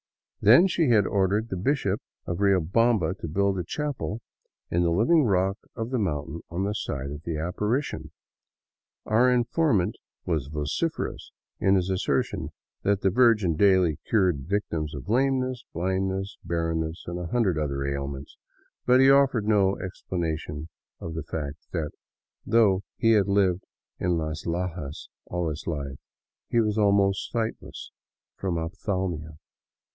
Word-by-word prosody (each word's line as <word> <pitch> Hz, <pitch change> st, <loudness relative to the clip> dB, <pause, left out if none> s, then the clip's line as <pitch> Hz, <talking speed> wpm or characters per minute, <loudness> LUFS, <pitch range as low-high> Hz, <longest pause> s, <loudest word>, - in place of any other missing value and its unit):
Then 120 Hz, -, +8 dB
she 170 Hz, -6 st, +2 dB
had 105 Hz, -4 st, +5 dB
ordered 100 Hz, +4 st, +1 dB
the -, -, -2 dB
Bishop 100 Hz, 0 st, 0 dB, 0.2 s
of 85 Hz, +1 st, -3 dB
Riobamba 100 Hz, 0 st, +3 dB
to -, -, -5 dB
build 100 Hz, +4 st, +1 dB
a -, -, -1 dB
chapel 135 Hz, -, -3 dB, 0.5 s
in 85 Hz, -, +2 dB
the 85 Hz, -, +2 dB
living 120 Hz, -, +4 dB
rock 95 Hz, 0 st, +1 dB, 0.2 s
of 115 Hz, +1 st, -4 dB
the 130 Hz, -, 0 dB
mountain 80 Hz, -3 st, -2 dB
on 85 Hz, +3 st, -2 dB
the 100 Hz, +1 st, -1 dB
site 70 Hz, -9 st, -4 dB
of 75 Hz, +1 st, -7 dB
the 80 Hz, -1 st, -3 dB
apparition. 105 Hz, -, -2 dB, 1.0 s
Our 120 Hz, +4 st, +4 dB
informant 120 Hz, -, +2 dB, 0.3 s
was 80 Hz, -6 st, -1 dB
vociferous 75 Hz, -, -3 dB, 0.3 s
in 95 Hz, 0 st, +4 dB
his 95 Hz, 0 st, +1 dB
asser 95 Hz, -, +1 dB
tion -, -, -6 dB, 0.3 s
that 100 Hz, 0 st, +1 dB
the 95 Hz, -, +2 dB
Virgin 105 Hz, -7 st, +4 dB
daily 95 Hz, -4 st, +4 dB
cured 90 Hz, -10 st, +2 dB
victims 85 Hz, -7 st, -2 dB
of 70 Hz, -, -8 dB
lameness, 130 Hz, +1 st, +1 dB
blindness, 95 Hz, +2 st, -2 dB
barren 85 Hz, -1 st, -1 dB
ness, 80 Hz, +1 st, -4 dB
and 85 Hz, +1 st, -4 dB
a 90 Hz, -, -4 dB
hundred 95 Hz, -5 st, +1 dB
other 70 Hz, -2 st, -2 dB
ailments; 70 Hz, 0 st, -4 dB, 0.5 s
but 125 Hz, +1 st, +6 dB
he 135 Hz, -, +6 dB
oflfered 135 Hz, -5 st, +4 dB
no 100 Hz, -2 st, +3 dB
explanation 80 Hz, -4 st, -4 dB, 0.3 s
of 80 Hz, -, -6 dB
the 80 Hz, -, -3 dB
fact 75 Hz, -2 st, -5 dB, 0.2 s
that 80 Hz, -4 st, -2 dB, 0.5 s
though 105 Hz, -5 st, +3 dB, 0.2 s
he 115 Hz, -, +3 dB
had 105 Hz, -3 st, +4 dB
lived 95 Hz, -2 st, +2 dB, 0.4 s
in 90 Hz, -1 st, +1 dB
Las 80 Hz, 0 st, -4 dB
Lajas 85 Hz, -4 st, -4 dB, 0.2 s
all 90 Hz, -2 st, -1 dB
his 75 Hz, -, -7 dB
life, 70 Hz, -4 st, -4 dB, 0.5 s
he 120 Hz, -, +2 dB
was 110 Hz, -1 st, +1 dB
almost 100 Hz, -1 st, +2 dB
sightless 115 Hz, -2 st, -4 dB, 0.4 s
from 90 Hz, -3 st, -2 dB
ophthalmia. 85 Hz, -3 st, -3 dB
95 Hz, 150 wpm, -26 LUFS, 80-110 Hz, 1.0 s, Then